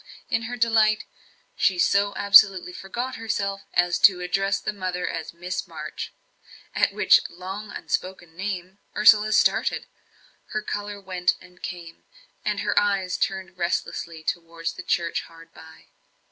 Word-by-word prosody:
In -, -, +2 dB
her 245 Hz, -, -5 dB
delight, 220 Hz, -2 st, +3 dB, 0.5 s
she 190 Hz, -, +2 dB
so 200 Hz, +3 st, +2 dB
absolutely 195 Hz, -3 st, +6 dB
forgot 240 Hz, +8 st, -5 dB
herself 200 Hz, -3 st, -2 dB
as 175 Hz, 0 st, +2 dB
to 185 Hz, -3 st, +6 dB
address 195 Hz, +2 st, 0 dB
the 210 Hz, -, -3 dB
mother 185 Hz, -2 st, -3 dB
as 160 Hz, -1 st, -4 dB
Miss 180 Hz, +2 st, -5 dB
March; -, -, -7 dB, 0.6 s
at -, -, +2 dB
which -, -, +5 dB
long 190 Hz, +4 st, -7 dB
unspoken 175 Hz, -3 st, -4 dB
name 190 Hz, 0 st, -5 dB, 0.2 s
Ursula 215 Hz, 0 st, +6 dB
started, 210 Hz, -, +2 dB, 0.7 s
her 215 Hz, -, -2 dB
colour 205 Hz, -1 st, -4 dB
went 185 Hz, -2 st, 0 dB
and 180 Hz, -1 st, -18 dB
came, 170 Hz, -2 st, -8 dB, 0.4 s
and -, -, -1 dB
her -, -, +3 dB
eyes 195 Hz, -3 st, 0 dB
turned 190 Hz, -2 st, -3 dB
restlessly 170 Hz, -1 st, -3 dB
towards 165 Hz, 0 st, -3 dB
the -, -, -8 dB
church 170 Hz, -2 st, 0 dB
hard 165 Hz, 0 st, -16 dB
by. 160 Hz, 0 st, -15 dB
190 Hz, 140 wpm, -24 LUFS, 175-205 Hz, 0.7 s, absolutely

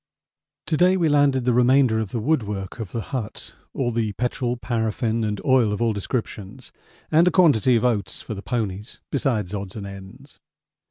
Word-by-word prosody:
To 155 Hz, -, 0 dB
day 185 Hz, +3 st, +4 dB
we 165 Hz, -3 st, +2 dB
landed 140 Hz, -3 st, +3 dB
the 125 Hz, -, +3 dB
remainder 125 Hz, -1 st, +4 dB
of 110 Hz, -3 st, -3 dB
the 115 Hz, -, -3 dB
woodwork 105 Hz, -, -2 dB
of 105 Hz, -5 st, -6 dB
the 115 Hz, -, -3 dB
hut, 115 Hz, -5 st, -5 dB, 0.2 s
all 120 Hz, -3 st, -1 dB
the 110 Hz, -2 st, -1 dB
petrol, 125 Hz, +2 st, -2 dB
paraffin 115 Hz, -1 st, -1 dB
and 105 Hz, -2 st, -2 dB
oil 130 Hz, -5 st, +4 dB
of 105 Hz, -, -2 dB
all 115 Hz, -1 st, +1 dB
descriptions, 105 Hz, -1 st, -5 dB, 0.4 s
and 165 Hz, +3 st, +5 dB
a -, -, +4 dB
quantity 145 Hz, -, +4 dB
of 115 Hz, -, +1 dB
oats 105 Hz, -6 st, -1 dB
for 110 Hz, -, -6 dB
the 100 Hz, -, -7 dB
ponies 105 Hz, -3 st, -4 dB
besides 115 Hz, -9 st, -1 dB
odds 100 Hz, -2 st, -5 dB
and 105 Hz, -2 st, -6 dB
ends. 100 Hz, +8 st, -12 dB
115 Hz, 180 wpm, -23 LUFS, 105-130 Hz, 0.4 s, and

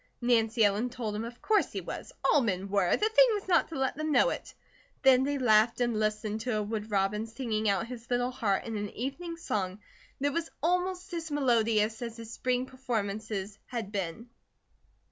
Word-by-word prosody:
Nancy 230 Hz, -2 st, +3 dB
Ellen 205 Hz, +5 st, +1 dB
told 230 Hz, -4 st, -4 dB
him 215 Hz, -, -2 dB
of 235 Hz, +1 st, -8 dB
course 430 Hz, -1 st, +2 dB
he -, -, -3 dB
was, -, -, -7 dB
all 295 Hz, -, +5 dB
men 195 Hz, -4 st, -1 dB
were, 195 Hz, -3 st, +2 dB
the 425 Hz, -, +2 dB
thing -, -, +6 dB
was 410 Hz, -2 st, -3 dB
not 355 Hz, -2 st, +4 dB
to 325 Hz, -, -5 dB
let 265 Hz, -1 st, 0 dB
them 310 Hz, +1 st, -2 dB
know -, -, +4 dB
it. -, -, -6 dB, 0.5 s
Then 265 Hz, -1 st, +6 dB
they 285 Hz, +1 st, 0 dB
laughed 230 Hz, -2 st, +4 dB
and 240 Hz, -3 st, +1 dB
listened 215 Hz, 0 st, -1 dB
to 235 Hz, -1 st, -1 dB
a 210 Hz, -, 0 dB
wood 215 Hz, +1 st, -4 dB
robin 210 Hz, +2 st, 0 dB
singing 225 Hz, -2 st, -1 dB
out 200 Hz, +2 st, +1 dB
his 235 Hz, -1 st, -9 dB
little 245 Hz, 0 st, +1 dB
heart 210 Hz, -6 st, 0 dB
in 225 Hz, -2 st, -3 dB
an 205 Hz, 0 st, -3 dB
evening 330 Hz, +8 st, -4 dB
song 195 Hz, -, -2 dB, 0.4 s
that 285 Hz, +1 st, 0 dB
was 335 Hz, -1 st, -2 dB
almost 360 Hz, +2 st, 0 dB
as 330 Hz, -1 st, -3 dB
melodious 230 Hz, -6 st, +2 dB
as 230 Hz, -1 st, -5 dB
his 230 Hz, 0 st, -8 dB
spring 250 Hz, 0 st, 0 dB
performances 215 Hz, -5 st, -3 dB
had 230 Hz, -5 st, -4 dB
been. 200 Hz, +4 st, -4 dB
230 Hz, 195 wpm, -30 LUFS, 215-265 Hz, 0.5 s, thing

